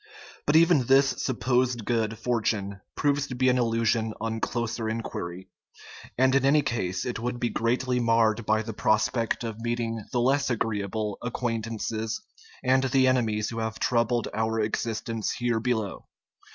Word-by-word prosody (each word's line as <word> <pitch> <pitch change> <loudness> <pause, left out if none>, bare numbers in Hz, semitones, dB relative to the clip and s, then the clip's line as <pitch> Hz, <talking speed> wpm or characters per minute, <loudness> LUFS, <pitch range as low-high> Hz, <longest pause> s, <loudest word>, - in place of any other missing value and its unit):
But 145 - +3
even 160 -6 +5
this 135 +1 +5
sup 130 -3 -2
posed 125 -3 +1
good 110 -1 0
fortune 105 -4 -1
proves 145 0 +1
to 125 - -5
be 130 +1 +3
an 125 0 +3
illusion 115 -1 +1
on 115 0 -2
closer 120 -1 -2
inquiry; 95 -5 -5 0.7
and 130 +1 +4
in 135 -1 +3
any 145 +2 +4
case 95 -8 -2
it 125 -3 -3
would 120 +1 -3
be 120 - 0
greatly 125 +2 0
marred 115 -1 +2
by 110 +1 +1
the 110 0 -6
prospect 110 +3 +1
of 115 -1 -5
meeting 115 -1 -2
the 120 - 0
less 135 +3 +2
agreeable 105 -2 -2
acquaint 120 -2 -2
ances 110 0 -3 0.5
and 130 0 +3
the 130 0 +3
enemies 110 -4 +1
who 115 - -4
have 110 0 -3
troubled 120 -1 +1
our 110 0 0
existence 110 0 -2
here 120 -2 0
below. 110 -4 -2
115 Hz, 160 wpm, -27 LUFS, 110-125 Hz, 0.7 s, even